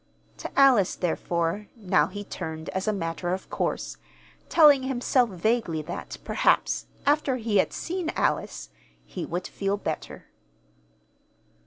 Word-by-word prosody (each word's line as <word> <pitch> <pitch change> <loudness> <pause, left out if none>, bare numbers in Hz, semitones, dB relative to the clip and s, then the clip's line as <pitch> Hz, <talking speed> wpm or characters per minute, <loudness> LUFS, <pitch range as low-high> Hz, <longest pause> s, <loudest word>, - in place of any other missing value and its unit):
To - - -6
Alice, 250 -9 +5
therefore, 170 +2 -1
now 180 -9 +2
he 205 +3 -6
turned 160 -4 -6
as 190 +2 -3
a - - +4
matter 175 -1 -2
of 190 - -11
course, - - -2 0.5
telling 295 -5 +7
himself 255 -1 +1
vaguely 185 -4 0
that, 170 - -6
perhaps, - - +2 0.2
after 290 -2 +2
he 225 -4 0
had 190 - +3
seen 350 -1 -3
Alice, - - -1 0.4
he 180 - -6
would 175 +2 -3
feel 200 0 -2
better. - - -5
200 Hz, 130 wpm, -26 LUFS, 175-250 Hz, 0.5 s, telling